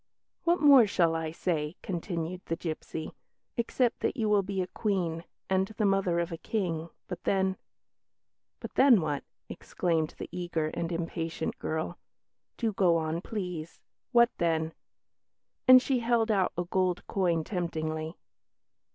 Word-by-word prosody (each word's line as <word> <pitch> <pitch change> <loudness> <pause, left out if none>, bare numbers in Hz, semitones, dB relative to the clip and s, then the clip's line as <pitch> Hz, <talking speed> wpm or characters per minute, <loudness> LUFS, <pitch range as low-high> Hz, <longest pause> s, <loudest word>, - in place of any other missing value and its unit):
"What 345 +1 +3
more 275 -6 +8
shall 170 -4 +2
I 160 -1 -2
say," 160 -1 -2
continued 175 -1 -3
the 165 - 0
gipsy, 160 -1 -5 0.4
"except 240 +1 +1
that - - -1
you 220 -3 +1
will 205 -1 +4
be 195 0 -3
a - - -3
Queen, 180 -4 -2 0.2
and 190 0 +2
the 215 - +2
mother 195 -3 +2
of 170 +1 -2
a 165 - -5
King; 170 -6 -2 0.2
but 180 - -6
then 190 -1 +1 0.5
" - - -58
"But - - -7
then, 260 -5 +6
what?" 150 -4 -2 0.2
exclaimed 165 -3 -1
the - - -6
eager 175 -3 -2
and 165 +2 -3
impatient 165 -1 -3
girl; 160 +2 -3 0.6
"do 225 -3 0
go 180 -4 +4
on, 160 +1 -2
please. 180 -6 -5 0.3
What 235 -1 +5
then?" 160 -1 +1 0.9
and 255 0 +11
she 260 -1 +1
held 230 -1 +2
out 195 -3 +2
a 175 - +1
gold 180 0 0
coin 175 -4 +1
temptingly. 160 -3 -3
175 Hz, 150 wpm, -29 LUFS, 165-200 Hz, 0.9 s, and